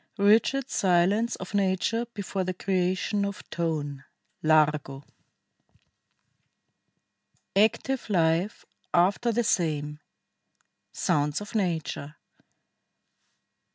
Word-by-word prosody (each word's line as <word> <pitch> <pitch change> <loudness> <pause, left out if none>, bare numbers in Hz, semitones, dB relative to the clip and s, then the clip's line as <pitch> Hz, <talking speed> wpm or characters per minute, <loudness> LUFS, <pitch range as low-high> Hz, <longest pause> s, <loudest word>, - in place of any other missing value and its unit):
86 200 - +2
1. - - +6
RIGID 275 +2 -3
SILENCE 195 +5 +2
OF 190 +1 -9
NATURE 200 +4 +1
BEFORE 195 -2 -3
THE 185 0 -3
CREATION 185 +2 0
OF 200 -1 -5
TONE 150 -5 -3 0.4
(Largo) 150 -3 +2 2.5
ACTIVE 225 +5 +1
LIFE 170 +1 +1 0.3
AFTER 195 +7 +3
THE 240 +2 +1
SAME. 150 -8 -1 0.9
SOUNDS 145 0 0
OF 210 - -9
NATURE. 165 -7 -2
185 Hz, 85 wpm, -27 LUFS, 155-205 Hz, 2.5 s, 1